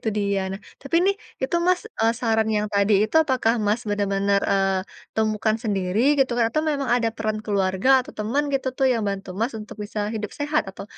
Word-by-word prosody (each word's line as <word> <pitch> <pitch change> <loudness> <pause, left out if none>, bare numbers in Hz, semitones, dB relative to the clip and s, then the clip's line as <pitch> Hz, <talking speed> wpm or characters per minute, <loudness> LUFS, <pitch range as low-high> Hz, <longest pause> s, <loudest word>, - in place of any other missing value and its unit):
itu - - -12
dia. 200 -1 0
Nah, 195 - -6 0.2
tapi 275 +4 -1
nih, 400 - +3 0.3
itu 265 +6 0
Mas, 365 0 +3 0.2
eee, 225 +1 +4
saran 220 -2 +1
yang 210 0 0
tadi 200 +1 +3
itu, 215 - -7
apakah 255 -5 +1
Mas 210 +3 +1
bener-bener, 200 -1 +1
eee, 195 -1 +2 0.4
temukan 215 0 +1
sendiri, 195 -2 -1 0.2
gitukah? 245 -3 +2
Atau 310 +6 0
memang 280 -2 -2
ada 235 -2 +1
peran 215 -1 -2
keluarga 190 +1 0
atau - - -12
temen, 225 +7 0
gitu 270 -1 -1
tuh, 265 - +2
yang 230 -2 -1
bantu 195 -1 -4
Mas 235 +4 0
untuk 210 - -10
bisa 210 +1 -7 0.2
hidup 210 -2 -4
sehat 295 +1 +1
atau 195 - -9
215 Hz, 195 wpm, -23 LUFS, 200-250 Hz, 0.4 s, eee